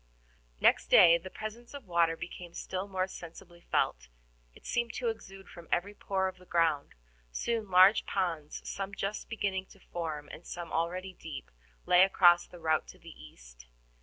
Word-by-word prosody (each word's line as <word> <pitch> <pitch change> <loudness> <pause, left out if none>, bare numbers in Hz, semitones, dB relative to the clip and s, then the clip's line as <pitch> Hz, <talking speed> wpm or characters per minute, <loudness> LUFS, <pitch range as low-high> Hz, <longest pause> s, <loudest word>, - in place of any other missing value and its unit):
Next - - +4
day 170 - +7
the 185 +3 -9
presence 225 +6 -8
of 280 -4 -9
water 170 -2 +2
became 175 0 -8
still 190 +1 -4
more 185 -1 -1
sensibly 175 -1 -11
felt; - - 0 0.5
it - - -18
seemed 235 -1 -1
to 240 -2 -1
exude 195 -3 -8
from 170 -1 -12
every 195 +4 0
pore 190 -2 -1
of 185 0 -6
the 180 - -17
ground. 160 -4 +1 0.4
Soon 225 - -2
large 185 +3 +6
ponds, 165 -6 -3
some 200 0 -4
just 200 +2 -4
beginning 195 -4 -2
to 195 - -18
form, 160 -5 -5
and 165 - -11
some 175 -1 -6
already 180 +3 -2
deep, 160 - -9 0.3
lay 180 0 +6
across 175 -2 +5
the 175 - -13
route 160 -2 0
to - - -12
the - - -13
east. - - -15
180 Hz, 170 wpm, -31 LUFS, 165-195 Hz, 0.5 s, day